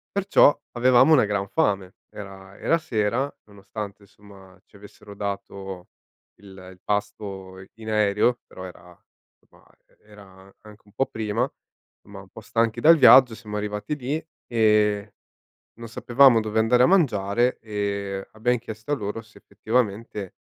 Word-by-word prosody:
Perciò, 195 -7 +4
avevamo 125 +5 +5
una 130 - +5
gran 100 -1 -2
fame. 100 - -1 0.2
Era 95 -1 -11
era 165 - +2
sera, 125 -2 -2
nonostante 105 0 -9
insomma 100 -1 -18
ci - - -25
avessero 100 0 -14
dato 100 -2 -6 0.5
il 100 0 -15 0.2
il 90 - -19
pasto 100 -2 -4
i 95 - -15
in 110 0 -9
aereo, 105 +3 +1
però 95 - -10
era 90 -1 -14 0.4
somma - - -26 0.2
e - - -33
era 100 -2 -17
anche 105 0 -15
un 105 - -23
po' 135 +6 0
prima, 110 +3 -2 0.6
insomma, - - -11
un - - -14
po' - - -13
stanchi 115 -1 -1
dal 165 +2 +7
viaggio 130 -4 +7
siamo 105 -2 -9
arrivati 105 +7 -4
lì 145 +4 -4 0.2
e 105 -3 +1 0.6
non 115 0 -10
sapevamo 120 +1 +4
dove 110 0 -2
andare 120 +3 +3
a - - +6
mangiare 120 - +1
e 100 -2 -4
abbiam 120 +3 0
chiesto 115 +3 -7
a - - +4
loro 105 -3 -5
se 115 +1 -21
effettivamente 110 -4 -3
105 Hz, 150 wpm, -24 LUFS, 100-120 Hz, 0.6 s, dal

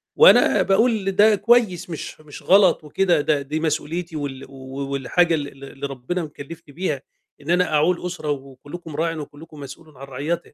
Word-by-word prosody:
وأنا 480 - +6
باقول 200 0 +2
ده 210 +2 +5
كويس 210 -4 +2
مش 160 -1 -7
مش 150 -2 -12
غلط 190 -3 +4
وكده، 170 +1 +1
ده 145 -1 +1
دي 150 +3 -3
مسؤوليتي 165 +1 -3
وال 135 -2 -5
و 135 +1 -7
والحاجة 165 +6 +2
ال 145 -2 -3
ال 135 0 -14
اللي 140 0 -5
ربنا 140 +7 -4
مكلِّفني 150 +1 -10
بيها 155 -6 -2 0.4
إن 145 - -10
أنا 180 -1 +2
أعول 170 +4 +2
أسرة، 175 -4 -5
وكُلّكم 145 +4 -8
راعٍ 165 +1 -1
وكُلّكم 150 +1 -10
مسؤولٌ 145 +1 -11
عن 135 - -9
رعيته. 145 +7 -4
155 Hz, 170 wpm, -22 LUFS, 140-180 Hz, 0.4 s, وأنا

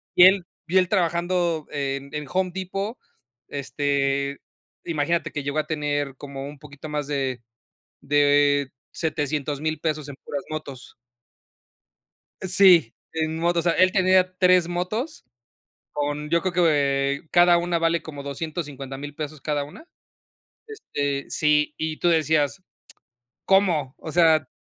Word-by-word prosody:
y 175 - +8
él 190 -1 +5 0.2
y 180 +2 +2
él 185 -2 +3
trabajando 170 -3 0
en 140 -1 -3
en 150 0 -4
Home 185 -1 +1
Depot, 195 +5 -4 0.5
este 140 0 -1 0.4
imagínate 165 +1 -1
que 150 - -4
llegó 140 +2 -1
a - - -2
tener 145 -3 -2
como 140 0 -7
un 145 0 -10
poquito 145 +1 -10
más 150 -1 -3
de 135 -4 -2 0.6
de 145 -1 +3 0.2
700.000 150 -1 -2
pesos 155 -2 -2
en 140 - -8
puras 140 -1 -4
motos. 140 -5 -7 1.5
Sí, 185 - +5 0.2
en 160 0 -1
motos. 170 +1 +1
O 170 - +5
sea, - - -2
él 185 0 +5
tenía 185 -1 +3
3 180 -2 +4
motos 215 - -3 0.7
con 145 +1 -2
yo 170 0 +2
creo 185 - -1
que 140 -5 +2
cada 175 0 +6
una 175 0 0
vale 165 0 +1
como 145 -3 -8
250.000 140 -2 -6
pesos 155 -1 -6
cada 145 0 -1
una, 155 - -13 0.8
este, 145 - -3
sí, 150 -1 +2
y 155 0 -3
tú 175 - 0
decías: 160 +1 +2 0.8
"¿Cómo?", 175 -9 +2
o 160 - -7
sea, 160 -1 +4
155 Hz, 135 wpm, -24 LUFS, 145-175 Hz, 1.5 s, y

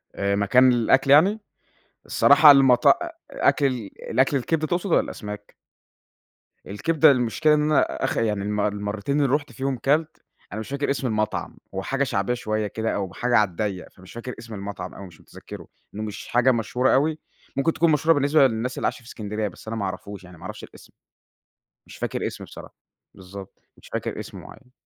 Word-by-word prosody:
آآ 100 0 0
مكان 125 +6 +4
للأكل 125 +3 +3
يعني؟ 190 +9 +5 0.7
الصراحة 150 -2 +7
المطا 135 -3 +5
أ 340 +9 +2 0.2
أكل 145 - +2
ال 125 -5 -1 0.3
الأكل 135 +2 +2
الكبدة 155 +5 -1
تقصد 175 +4 -2
والّا - - +4
الأسماك؟ 105 -1 -8 1.1
الكبدة، 145 +10 +3
المشكلة 135 +5 +2
إن 150 - +2
أنا 150 -1 +3 0.2
آخ 135 - -1
يعني 105 -3 0
الم 105 +1 -2
المرّتين 105 +7 -2
اللي 135 -2 +1
رُحت 145 -3 -4
فيهم 130 +3 -3
كَلت، 150 +5 -1 0.3
أنا 105 - -4
مش 110 - -7
فاكر 140 +1 -2
اسم 135 -1 -1
المطعم، 110 -2 -2 0.2
هو 95 - -3
حاجة 135 +5 -1
شعبية 120 -4 -1
شوية 110 -3 -2
كده، 110 +2 -3
أو 95 -2 -4
حاجة 120 -1 +1
على 105 -2 +3
الضيَّق، 95 +1 -4
فمش 95 0 -16
فاكر 120 +2 -7
اسم 115 0 -10
المطعم 100 -2 -7
أوي 100 - -10
مش 85 -3 -17
متذكره، - - -12 0.3
لإنه 110 +1 -5
مش 105 - -8
حاجة 125 +2 +3
مشهورة 125 +2 0
أوي، 155 +3 +1 0.4
ممكن 150 +4 +1
تكون 165 0 +2
مشهورة 155 +2 +3
بالنسبة 145 0 +4
للناس 120 +2 -4
اللي - - -2
عايشة - - -3
في 115 - -18
إسكندرية، 105 -1 -4
بس 100 - -12
أنا 115 - -4
ما 100 - -2
اعرفوش 95 +1 -7
يعني، 90 -1 -14
ما - - -16
اعرفش - - -8
الإسم - - -15 0.9
مش - - -12
فاكر - - -3
اسم - - -7
بصراحة. - - -12 0.4
بالضبط، 95 +1 -12 0.2
مش - - -17
فاكر - - -3
اسم - - -8
مُعيَّن. 125 -2 -15
120 Hz, 190 wpm, -23 LUFS, 105-140 Hz, 1.1 s, الصراحة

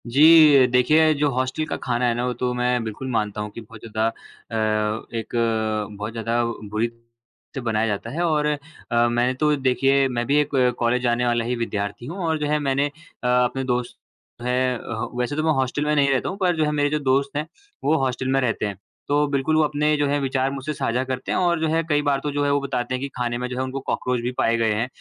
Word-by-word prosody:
जी, 150 0 +7
देखिए 150 +6 +4
जो 145 0 +1
हॉस्टल 130 +4 -1
का - - -3
खाना 125 0 -1
है 120 - +2
ना, 120 +1 -1
वो 125 - -1
तो 125 +1 -2
मैं 125 -1 0
बिल्कुल 110 +4 -6
मानता 105 -2 -1
हूँ 105 - -4
कि 115 - -6
बहुत 110 0 -13
ज़्यादा 110 0 0
अ, 110 -1 -3
एक 110 - -6 0.6
बहुत 105 +2 -4
ज़्यादा 115 +1 -1
बुरी 110 -1 -2 0.7
से 135 - -3
बनाया 110 -2 0
जाता 100 -2 -3
है 165 - -3
और 155 -3 +1
अ, 150 - +1 0.5
मैंने 120 +2 +1
तो 150 +3 +2
देखिए 135 0 +2
मैं 120 -2 -2
भी 145 - +3
एक 145 -1 -3 0.2
कॉलेज 120 +1 +1
जाने 120 0 +1
वाला 120 -1 +1
ही 125 +1 -1
विद्यार्थी 105 -1 -3
हूँ 165 +8 -6
और 160 -1 +1
जो 150 - -1
है 150 0 +1
मैंने 140 0 +1 0.4
अ, - - 0
अपने 125 +1 +2
दोस्त 125 -1 -2 0.5
है 125 0 +1
अ, 115 0 -5
वैसे 125 +4 -1
तो 155 - -1
मैं 160 - +3
हॉस्टल 130 +3 -1
में 150 0 +1
नहीं 140 -1 +3
रहता 135 -2 +1
हूँ 195 - -5
पर 180 -3 +1
जो 155 - +2
है 150 - 0
मेरे 145 -1 +1
जो 150 +1 0
दोस्त 140 +1 +1
हैं 150 +1 -2 0.4
वो 155 +3 +3
हॉस्टल 130 0 -2
में 135 0 +2
रहते 115 -4 0
हैं। 100 -2 -4 0.3
तो 145 +1 +2
बिल्कुल 140 +2 0
वो 155 - +4
अपने 150 +1 +1
जो 145 0 +1
है 145 +1 +1
विचार 135 0 0
मुझसे 140 +2 -4
साझा 125 -2 -1
करते 130 0 -4
हैं - - +1
और 175 -2 +2
जो 160 - +1
है 160 +1 +1
कई 145 -1 +3
बार 145 -2 +1
तो 150 - -2
जो 145 0 -1
है, 140 - +2
वो 145 - +2
बताते 130 -2 -2
हैं 130 - -5
कि 140 - -2
खाने 120 -1 -1
में 125 +1 -3
जो 125 - -5
है 130 - 0
उनको 130 +1 -4
कॉकरोच 125 -2 -2
भी 120 +1 -2
पाए 115 - +2
गए 115 -1 +2
हैं। 115 +3 -1
130 Hz, 245 wpm, -23 LUFS, 120-145 Hz, 0.7 s, जी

